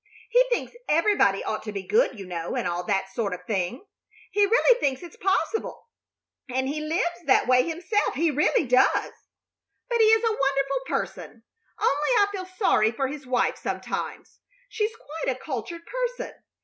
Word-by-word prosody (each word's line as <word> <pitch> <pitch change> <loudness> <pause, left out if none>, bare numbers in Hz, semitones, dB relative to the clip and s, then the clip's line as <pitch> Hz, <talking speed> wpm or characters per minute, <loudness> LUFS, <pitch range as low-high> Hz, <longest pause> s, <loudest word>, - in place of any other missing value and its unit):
He - - +6
thinks 480 - -1 0.2
everybody 315 - +3
ought 215 - -3
to 215 - -6
be 200 -2 -5
good, 435 - +2
you 195 - -7
know, 170 -2 -4
and - - -1
all 175 +1 -2
that 195 -1 0
sort 200 -5 -1
of 180 0 -14
thing. 210 - -2 0.5
He 410 0 +3
really 485 +2 +4
thinks 270 - -1
it's 345 - -10
possible, 395 +5 -1 0.6
and 260 +1 -1
he 300 +2 -2
lives 345 +2 -1
that 265 - +5
way 255 0 +5
himself. 365 - 0
He 320 +3 +2
really 295 +2 +2
does. 250 +1 +3 0.8
But 475 -1 +1
he - - +7
is 445 +1 +5
a 450 -2 +1
wonderful 275 -1 +1
person; 235 -6 -4 0.4
only 290 +2 +1
I 405 - +6
feel 375 -2 -5
sorry 370 - +2
for 265 +3 -2
his 285 -2 -8
wife 250 -1 +1
sometimes. - - -5 0.3
She's 435 0 -2
quite 305 - -4
a - - -14
cultured 315 +5 -5
person. - - -3
295 Hz, 175 wpm, -25 LUFS, 245-410 Hz, 0.8 s, he